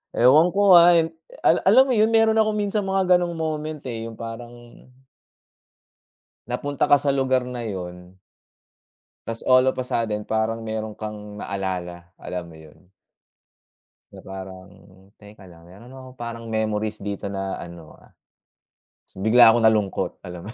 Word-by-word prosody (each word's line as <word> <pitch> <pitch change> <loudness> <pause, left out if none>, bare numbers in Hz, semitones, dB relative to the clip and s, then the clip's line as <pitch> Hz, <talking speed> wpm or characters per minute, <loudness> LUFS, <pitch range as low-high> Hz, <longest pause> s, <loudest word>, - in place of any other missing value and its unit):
Ewan 150 +8 +5
ko 200 -1 +5
nga 175 0 +8
ay 165 0 +2 0.6
alam 255 +7 +7
mo 260 - +1
yun, 215 +1 +3
meron 225 -1 +3
akong 215 -1 +1
minsan 205 0 -1
mga 190 -1 +3
gano'ng 175 -1 -1
moment, 155 -1 -4
eh, 115 -2 -5
yung 115 - -10
parang 120 +1 -10 1.6
napunta 140 +3 -2
ka 145 - +6
sa 140 - +1
lugar 130 -2 +1
na 125 -1 -6
yun 90 -1 -8 1.1
tapos 115 0 -5
all 130 0 +5
of - - +1
a - - -1
sudden 110 -4 -2
parang 110 +1 -1
meron 110 -1 -5
kang 105 -1 -8
naalala, 90 -3 -5
alam 90 -1 -6
mo 85 - -14
yun? 80 +3 -18 1.2
Na - - -14
parang 95 0 -9 0.5
teka 105 -1 -15
lang, 85 -1 -17
meron 115 +8 -15
akong 130 -1 -13
parang 115 -1 -7
memories 110 -1 -2
dito 100 -1 -5
na 95 -1 -5
ano, 85 -2 -11
ah - - -21 1.1
tapos 95 - -6
bigla 115 +1 +7
akong 115 0 +3
nalungkot. 105 -3 0
Alam 90 +5 -9
115 Hz, 150 wpm, -23 LUFS, 100-140 Hz, 1.6 s, nga